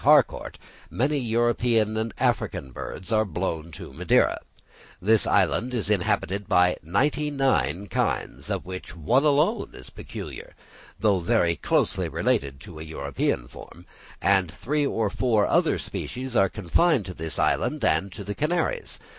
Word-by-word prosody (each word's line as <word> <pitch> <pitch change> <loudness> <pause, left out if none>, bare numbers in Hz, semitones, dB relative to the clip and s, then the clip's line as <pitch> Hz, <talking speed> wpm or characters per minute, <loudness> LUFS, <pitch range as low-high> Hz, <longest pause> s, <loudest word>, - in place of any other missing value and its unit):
Harcourt, - - +3 0.3
many 145 +4 0
European 115 -2 +1
and 110 +1 -1
African 65 - -1
birds 90 +7 -7
are 110 -1 +4
blown 85 -4 -3
to - - -9
Madeira; - - +2 0.6
this 110 +3 +3
island 125 +2 +2
is 105 -3 0
inhabited 100 0 0
by 90 0 +4
ninety 145 - 0
nine 100 - +1
kinds, 100 - -2
of - - -2
which 90 -3 -7
one 115 - +2
alone 150 -1 +2
is 65 - -11
peculiar, - - -8 0.4
though 100 -2 +3
very 85 0 +2
closely - - 0
related 70 -1 0
to 80 -3 -10
a - - -6
European 70 -5 -2
form; 85 +6 -13 0.3
and 95 -2 +3
three 145 - -1
or 110 -6 -1
four 110 -2 +2
other - - +2
species 130 0 -5
are 95 -3 +4
confined 115 - +2
to 90 - -6
this 80 -2 -3
island 150 -7 +1
and 90 +2 +1
to 100 - -8
the 105 +1 -4
Canaries. 175 - -1
105 Hz, 145 wpm, -25 LUFS, 85-125 Hz, 0.6 s, are